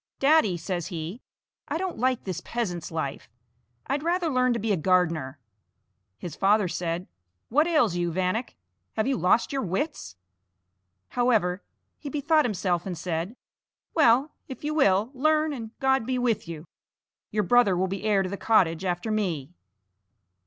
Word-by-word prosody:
"Daddy," 275 - +4
says 175 0 -3
he, 175 +5 -6 0.5
"I - - -1
don't 370 -5 -4
like 255 0 +1
this 180 -2 -4
peasant's 180 -7 -3
life; 160 -4 -4 0.6
I'd 280 +1 -1
rather 340 +1 0
learn 255 -2 +2
to - - -1
be 220 +1 -1
a - - +4
gardener." 165 -5 +1 0.8
His 170 +4 -7
father 200 0 +3
said: 170 0 -3 0.4
"What 300 +6 +3
ails 305 - +3
you, 175 -1 0
Vanek? 185 +7 -1 0.4
have 220 - 0
you 270 +1 +1
lost 180 - +2
your 270 - 0
wits?" 190 - -3 0.9
However, 215 -7 +1 0.4
he 290 - -6
bethought 305 +2 +2
himself 185 -5 -1
and 180 -3 -4
said: 170 +5 -3 0.6
"Well, 275 -1 +4 0.2
if 265 - -9
you 300 +1 -1
will, 215 -6 +3
learn, 310 +3 +2
and 230 -5 -6
God 265 -3 +2
be 255 0 0
with 240 -7 0
you! 165 -1 -7 0.6
Your 210 0 0
brother 200 -2 +4
will 185 - +2
be 195 +1 -4
heir 205 -3 +3
to 185 - -3
the 200 - -4
cottage 185 -7 +2
after 180 +4 -2
me." 175 -8 -2
210 Hz, 160 wpm, -26 LUFS, 175-260 Hz, 0.9 s, Daddy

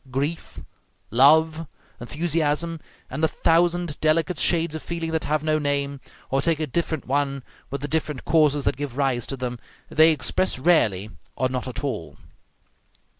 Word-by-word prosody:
Grief, 140 +6 -3 0.5
love, 155 +5 +4 0.3
enthusiasm, 160 +3 -1 0.3
and 135 +4 -5
the 160 - +4
thousand 170 0 +1
delicate 160 +1 +2
shades 165 -2 +1
of 160 - -4
feeling 165 -1 -4
that 160 -1 -1
have 155 0 0
no 155 0 +1
name, 140 -1 -1 0.3
or 135 +1 +2
take 165 +1 +1
a 155 - 0
different 160 0 -2
one 140 0 -1 0.3
with 140 -1 -4
the 145 - -3
different 150 -3 -2
causes 150 -3 +3
that - - +1
give 140 -3 -5
rise 130 -4 0
to 135 - -4
them, 125 -1 -4 0.3
they 160 +1 +6
express 175 +3 0
rarely, 110 - +2 0.2
or 130 - 0
not 125 0 -3
at 125 +2 -5
all. 105 - -4
150 Hz, 160 wpm, -24 LUFS, 135-160 Hz, 0.5 s, they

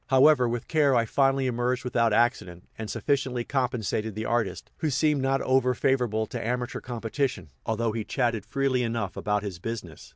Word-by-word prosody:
However, 130 -1 +5
with 120 -1 -3
care 145 -4 +3
I 115 -1 +3
finally 135 +3 +2
emerged 125 0 0
without 120 -2 +1
accident, 105 -6 0
and 110 -1 -6
sufficiently 135 -1 -1
compensated 120 -5 -1
the 110 +1 -3
artist, 115 -4 -1
who 155 - -1
seemed 150 +1 +2
not 135 +1 +1
over 130 -1 +2
favorable 120 -5 +1
to - - -5
amateur 125 +1 -2
competition, 120 - -3 0.2
although 110 +1 0
he 110 0 -3
chatted 120 -2 -1
freely 135 -2 0
enough 115 -6 -2
about 105 0 -1
his 95 -4 -5
business. 105 -7 -6
120 Hz, 170 wpm, -27 LUFS, 110-130 Hz, 0.2 s, However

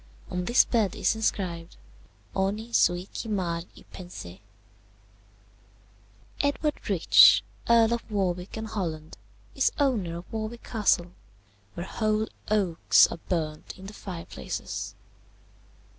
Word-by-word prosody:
On 180 0 -2
this 240 +5 +5
bed 220 -5 +1
is - - +1
inscribed, 180 -6 -2 0.6
Honi 205 +4 -2
soit 175 -1 +2
qui 225 - -5
mal 175 -5 -1
y - - -14
pense. 180 - -9 2.1
"Edward 285 -2 -1
Rich, 185 -5 +7 0.3
Earl 230 -1 +5
of 235 - -4
Warwick 185 -2 -2
and 220 - -4
Holland, 165 -7 -5 0.3
is 270 - +2
owner 215 - 0
of 175 - -11
Warwick 220 +2 -4
Castle, 195 -6 +1 0.6
where 170 - -4
whole 215 +1 0 0.2
oaks 195 -6 +4
are - - -6
burnt 155 -4 -3
in 190 - -11
the 200 - -8
fireplaces. 170 - -6
195 Hz, 115 wpm, -27 LUFS, 175-220 Hz, 2.1 s, Rich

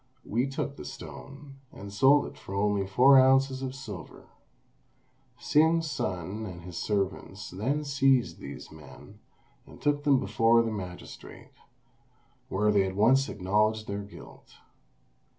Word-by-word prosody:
We 120 +5 0
took 140 +1 -4
the - - -8
stone, 140 0 -10
and 100 0 -10
sold 135 +7 +5
it - - -9
for 95 - -9
only 100 -1 0
four 130 +7 +6
ounces 135 0 +3
of 130 0 -4
silver." 100 - -10 1.1
Hsing's 160 0 +2
son 95 +4 -4
and 85 -3 -9
his 90 -1 -9
servants 100 0 -3
then 130 +11 -2
seized 135 -3 +1
these - - -9
men, 80 -2 -14 0.5
and - - -14
took 145 0 0
them 140 -3 +4
before 115 +3 +3
the 115 - -2
magistrate, 90 -4 -9 1.0
where 105 +2 +1
they 100 -1 +3
at 95 - -5
once 130 +7 +3
acknowledged 105 +3 0
their 100 0 -4
guilt. 100 0 -14
110 Hz, 135 wpm, -28 LUFS, 100-135 Hz, 1.1 s, four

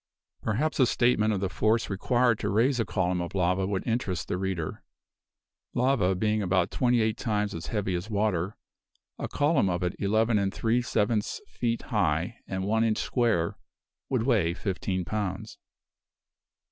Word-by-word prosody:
Perhaps 135 +10 -1
a 130 - +6
statement 115 -3 +2
of 100 -3 -1
the 95 - +1
force 110 +4 +1
required 120 +3 +2
to - - -1
raise 120 +5 +2
a 115 - +1
column 90 -2 0
of 85 +2 -5
lava 90 +1 +1
would 95 -2 -2
interest 110 -7 -1
the - - 0
reader. 95 -4 -3 0.9
Lava 125 -7 +2
being 105 +3 +1
about 90 -2 +1
twenty 120 -2 +2
eight 110 -1 0
times 105 -3 -1
as 80 - -6
heavy 100 -4 -1
as 90 +4 -3
water, 100 -3 0 0.6
a - - -2
column 145 - +2
of 90 0 -1
it 90 - -1
eleven 110 +2 +2
and 100 -1 0
three 115 +2 +1
sevenths 105 -2 0
feet 115 -1 -2
high, - - 0
and 95 0 -3
one 110 +3 +2
inch 110 -2 +1
square, 110 -10 0 0.5
would 125 -4 +1
weigh 105 -10 +2
fifteen 95 -2 -2
pounds. 105 +2 -4
105 Hz, 160 wpm, -28 LUFS, 95-115 Hz, 0.9 s, a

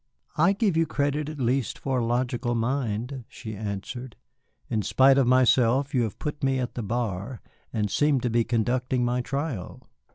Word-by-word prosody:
"I 170 +5 +4
give 200 -4 +1
you 165 0 +2
credit 145 +1 -1
at 155 - -7
least 125 -1 0
for 135 -2 -1
a - - 0
logical 120 0 0
mind," 120 +1 -2
she 115 -5 -8
answered. 110 +4 -5 0.5
"In 110 - 0
spite 135 +7 +5
of 130 - +3
myself 130 +2 +4
you 125 - +3
have 110 -4 -2
put 150 -1 -5
me 135 -1 +2
at 125 -2 -2
the 120 - -4
bar 115 +1 -3 0.3
and 105 -3 -1
seem 145 -2 +3
to 125 - 0
be 115 0 +3
conducting 125 +2 0
my 125 +1 0
trial." 140 - -4
125 Hz, 175 wpm, -26 LUFS, 115-140 Hz, 0.5 s, spite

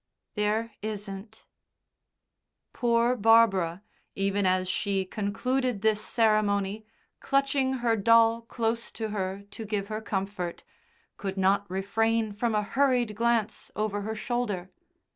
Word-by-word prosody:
"There 215 +2 0
isn't." 210 0 -7 1.3
Poor 235 0 +2
Barbara, 200 -6 +4 0.3
even 195 0 +1
as 185 0 +1
she 195 +1 0
concluded 225 +3 -1
this 215 -1 +3
ceremony, 215 -2 +1 0.3
clutching 275 -1 +1
her 230 -1 +4
doll 230 +2 +4
close 230 0 -2
to 220 -1 -4
her 195 -1 -3
to 225 - -7
give 205 -1 -3
her 215 0 -3
comfort, 195 -4 -4 0.5
could 195 -1 -4
not 195 +1 +2
refrain 220 +3 0
from 225 +2 -1
a 210 - +2
hurried 250 -1 +1
glance 230 -1 0
over 210 -1 -1
her 220 +2 -4
shoulder. 215 -6 -2
215 Hz, 120 wpm, -28 LUFS, 200-230 Hz, 1.3 s, Barbara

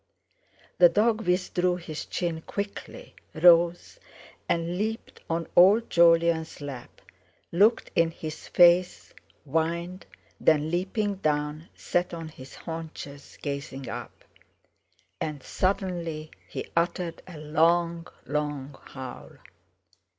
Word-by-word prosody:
The 175 -1 +9
dog 215 +3 +1
withdrew 180 0 +1
his 165 -3 -7
chin 170 -3 -2
quickly, 200 +4 -6 0.2
rose, 170 +1 +4 0.5
and 170 +1 0
leaped 220 +4 -4
on 165 0 -1
old 205 +6 +6
Jolyon's 165 -1 +4
lap, 140 -4 -8 0.5
looked 210 +7 +3
in 165 -1 +4
his 160 -1 -8
face, 175 +1 +4 0.3
whined; 170 +4 -2 0.3
then, 155 0 +3
leaping 195 +3 -1
down, 150 -1 -2
sat 175 0 -1
on 165 -1 -7
his 135 -3 -12
haunches, 160 -4 -8
gazing 140 -2 -5
up. - - -8 1.0
And 150 -3 -4
suddenly 175 -5 -2 0.2
he - - -6
uttered 170 0 -1
a 180 -4 -10
long, 165 +3 +1 0.2
long 145 -2 -3
howl. 130 -2 -9
170 Hz, 105 wpm, -27 LUFS, 155-180 Hz, 1.0 s, The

